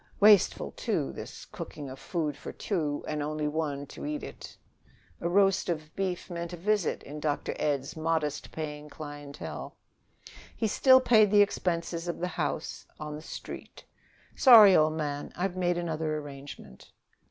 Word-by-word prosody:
Wasteful, 210 -2 +5
too, 65 - -2
this - - -8
cooking 145 -2 -8
of 130 0 -9
food 155 -5 -2
for 140 - -8
two 155 -8 -2
and 150 -1 -2
only 150 +1 -2
one 150 -2 -2
to - - -10
eat 300 0 -3
it. - - -9 0.6
A 170 - -1
roast 195 0 +3
of 155 -2 -4
beef 185 -2 -2
meant 170 -1 -5
a - - -5
visit, 205 0 0
in 150 +2 -8
Dr. 150 -1 -1
Ed's 140 -2 -1
modest 155 -2 -1
paying 150 -1 -6
clientele. 145 -1 -8 0.8
He 225 - 0
still 260 +4 +6
paid 220 -5 +5
the 205 0 +7
expenses 170 -3 -2
of 175 - -2
the 180 +1 -2
house - - -3
on 150 -1 -5
the 150 - -8
Street. - - -9 0.5
"Sorry, 220 -7 +9
old 155 0 +4
man; 145 -2 -3
I've 185 0 -2
made 175 -1 +1
another 160 -2 -2
arrangement." 140 - -10
160 Hz, 155 wpm, -29 LUFS, 150-185 Hz, 0.8 s, Sorry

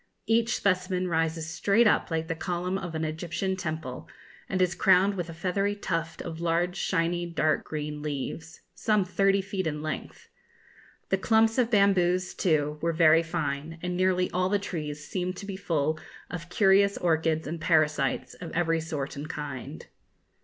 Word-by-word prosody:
Each 230 +1 +2
specimen 185 -1 0
rises 160 -1 0
straight 200 +7 +3
up 215 - +3
like 160 -1 -1
the 165 - -1
column 180 +2 -2
of 175 -4 -4
an 160 0 -1
Egyptian 170 +4 -2
temple, 155 -8 -5 0.4
and 190 - -1
is 185 0 +3
crowned 190 +3 +4
with 175 -3 -4
a - - -6
feathery 195 +4 0
tuft 165 -5 -3
of 165 -1 -6
large 170 +1 +1
shiny 175 -2 0
dark 160 -2 +1
green 150 -1 -4
leaves, 150 +2 -5
some 210 -3 +1
thirty 195 +1 +2
feet 190 -2 -3
in 150 -1 -3
length. 155 - -6 0.8
The 195 - +1
clumps 225 +3 +3
of 240 -2 +3
bamboos, 185 -4 +3
too, 150 -3 +1
were 170 0 +1
very 165 0 +6
fine, 160 -1 -3
and 180 0 -2
nearly 185 0 +2
all 185 +1 +1
the 205 - +3
trees 150 -7 -5
seemed 185 0 -3
to 200 - -7
be 200 -1 -5
full 160 -5 -1 0.3
of 170 -1 -6
curious 200 +1 +4
orchids 160 -2 +1
and 160 +2 -5
parasites 155 -2 +1
of 170 - -8
every 165 -1 +1
sort 150 -4 -4
and 145 +2 -6
kind. 135 - -6
175 Hz, 165 wpm, -28 LUFS, 160-190 Hz, 0.8 s, very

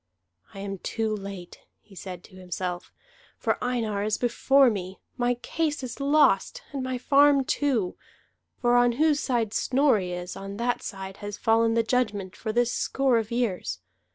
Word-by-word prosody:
"I 195 - -6
am 195 -1 -5
too 220 +1 -2
late," 195 -3 -8 0.2
he 205 - -20
said 180 -1 -8
to - - -16
himself, 180 -1 -5 0.5
"for - - -1
Einar 230 -5 -1
is 210 +1 0
before 260 +2 +4
me. 190 -2 -5 0.2
My 245 -1 +1
case 295 +4 -2
is 250 +1 -6
lost, 280 -8 +3
and 275 - -3
my 255 0 -2
farm 280 +1 +4
too; 255 -11 0 0.6
for 240 0 +3
on 245 0 +4
whose 300 +3 +2
side 235 -7 0
Snorri 250 -10 +2
is, 180 0 -5
on 195 +1 -7
that 240 +2 -1
side 195 -1 -7
has 205 0 -6
fallen 225 0 +3
the 230 - +3
judgment 215 -6 -1
for 220 - -4
this 240 +1 +1
score 265 -4 +1
of 220 -1 -4
years. 200 - -2
225 Hz, 165 wpm, -26 LUFS, 195-255 Hz, 0.6 s, before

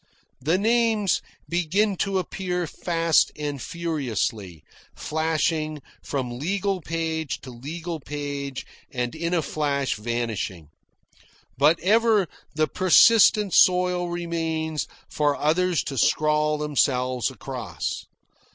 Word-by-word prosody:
The 160 +7 +2
names 220 -2 +2 0.3
begin 180 +5 +1
to 195 +1 0
appear 180 -1 -2
fast 165 0 +1
and 145 -3 -4
furiously, 115 - -3 0.3
flashing 155 -1 -1 0.2
from 125 -3 -4
legal 195 +4 -1
page 160 -1 -3
to 130 - -9
legal 160 +7 -6
page 140 -1 -5 0.2
and 125 -2 -3
in 170 +2 -2
a 165 - +1
flash 140 -2 -1
vanishing. 105 -7 -3 0.9
But 150 +6 +4
ever 215 0 +3 0.3
the 155 0 +2
persistent 205 +2 +5
soil 180 -1 +4
remains 165 -2 -2 0.2
for 145 -1 +1
others 170 +1 +1
to 135 -3 -3
scrawl 150 +1 +2
themselves 130 -4 +1
across. 120 - -5
155 Hz, 105 wpm, -24 LUFS, 140-180 Hz, 0.9 s, persistent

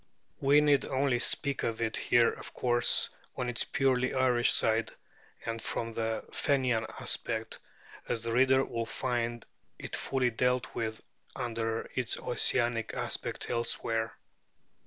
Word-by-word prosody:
We 145 +2 +5
need 145 -2 +3
only 135 -2 +1
speak 140 +3 +1
of 115 -1 -2
it 110 -1 -1
here 120 -1 +4
of - - -10
course 120 -1 +3 0.3
on 125 - -1
its 120 - 0
purely 130 -2 +1
Irish 125 -2 +3
side 110 +1 +3 0.6
and 115 0 -3
from 115 +1 -3
the 110 0 -2
Fenian 130 -6 +1
aspect, 110 -1 -2 0.5
as 115 -1 -1
the 115 - -2
reader 130 +2 +4
will 115 -1 -3
find 120 -2 -2 0.3
it - - -4
fully 130 -2 0
dealt 125 +2 0
with 110 -1 -4 0.3
under 115 -1 -2
its 125 -3 -1
Ossianic 120 -2 0
aspect - - -3
elsewhere. 115 -1 -1
120 Hz, 135 wpm, -30 LUFS, 115-130 Hz, 0.6 s, We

